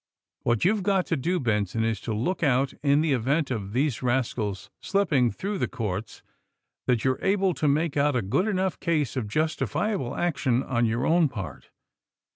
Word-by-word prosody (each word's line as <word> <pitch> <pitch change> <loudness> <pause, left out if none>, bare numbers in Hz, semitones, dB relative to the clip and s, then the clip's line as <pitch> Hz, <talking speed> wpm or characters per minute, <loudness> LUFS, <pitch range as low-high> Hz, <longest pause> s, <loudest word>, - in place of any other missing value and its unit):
What 120 -2 +1
you've 205 +2 +3
got 190 -1 +1
to 165 - 0
do, 175 +6 0
Benson, 110 -3 0
is 110 -2 -1
to - - -4
look 120 - -1
out, 135 -3 +2
in 145 0 +3
the 155 -3 +2
event 135 +4 0
of 100 -5 -3
these 130 +2 0
rascals 120 -6 -1
slipping 155 -12 +2
through 200 - -4
the - - +1
court, 105 -1 -5 0.6
that 120 -2 +1
you 130 - +4
are 130 - -6
able 195 -1 +2
to 155 - -1
make 150 +2 +1
out 145 -1 +2
a 120 - +1
good 135 - +1
enough 190 -3 -1
case 155 -8 0
of 125 -5 -2
justifiable 155 - -1
action 135 -7 0
on 120 -3 +1
your 120 +4 0
own 165 -2 +4
part. 95 - -7
135 Hz, 185 wpm, -26 LUFS, 115-170 Hz, 0.6 s, you